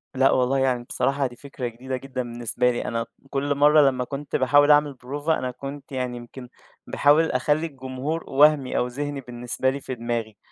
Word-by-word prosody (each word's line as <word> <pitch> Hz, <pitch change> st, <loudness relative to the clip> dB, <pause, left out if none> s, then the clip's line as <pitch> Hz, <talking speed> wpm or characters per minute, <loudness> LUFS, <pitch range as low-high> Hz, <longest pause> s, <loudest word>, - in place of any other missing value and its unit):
لأ 135 Hz, +1 st, +4 dB
والله، 130 Hz, +1 st, +2 dB
يعني 125 Hz, -2 st, +1 dB
بصراحة 140 Hz, -1 st, 0 dB
دي 120 Hz, -, -12 dB
فكرة 135 Hz, -2 st, -6 dB
جديدة 130 Hz, +3 st, -5 dB
جدًا 130 Hz, 0 st, -5 dB
بالنسبة 120 Hz, +1 st, -1 dB
لي. 120 Hz, -, -3 dB
أنا 115 Hz, -1 st, -2 dB, 0.2 s
كل 145 Hz, +1 st, -1 dB
مرّة 150 Hz, +2 st, +6 dB
لمّا 125 Hz, -1 st, -2 dB
كنت 140 Hz, +2 st, -5 dB
باحاول 145 Hz, +3 st, +5 dB
أعمل 145 Hz, -1 st, +4 dB
بروفة، 145 Hz, +5 st, -2 dB
أنا 130 Hz, -, -3 dB
كنت 140 Hz, +3 st, -9 dB
يعني 125 Hz, -2 st, -3 dB
يمكن 120 Hz, +1 st, -10 dB, 0.4 s
باحاول 150 Hz, +3 st, +3 dB
أخلّي 150 Hz, +5 st, +1 dB
الجمهور 135 Hz, +3 st, -5 dB
وهْمِي 145 Hz, -1 st, +4 dB
أو 125 Hz, -, +1 dB
ذِهني 145 Hz, +2 st, -4 dB
بالنسبة 125 Hz, +1 st, -2 dB
لي 140 Hz, +1 st, -4 dB
في 130 Hz, -, -5 dB
دماغي، 115 Hz, -2 st, -4 dB
130 Hz, 185 wpm, -24 LUFS, 125-145 Hz, 0.4 s, مرّة